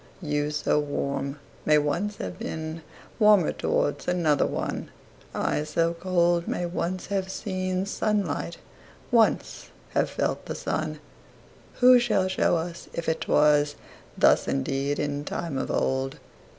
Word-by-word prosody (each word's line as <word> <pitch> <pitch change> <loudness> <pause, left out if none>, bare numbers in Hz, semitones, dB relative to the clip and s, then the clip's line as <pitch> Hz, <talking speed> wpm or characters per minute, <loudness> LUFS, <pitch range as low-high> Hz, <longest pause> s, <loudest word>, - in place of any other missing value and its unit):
You, 150 -4 -1
so 150 0 +1
warm, 140 -1 -2 0.3
may 150 0 +5
once 170 +8 0
have 90 -1 -6
beenWarmer 165 +5 0
towards 145 - 0
another 170 -5 +2
one:I, 150 - -4
so 165 +2 0
cold, 175 -1 +1
may 175 - -1
once 175 +1 -3
have 190 -1 0
seenSunlight, 185 -2 -2 0.5
once 230 -2 +2 0.2
have - - +1
felt - - -2
the - - -4
sun:Who 250 0 0
shall 210 -6 +2
show 185 -2 +2
us 170 +1 -5
if 170 - -4
it 160 - -1
wasThus 150 -1 +2
indeed 135 - -1
in 145 -1 -2
time 165 0 -4
of - - -3
old? 135 0 0
165 Hz, 115 wpm, -26 LUFS, 145-185 Hz, 0.5 s, may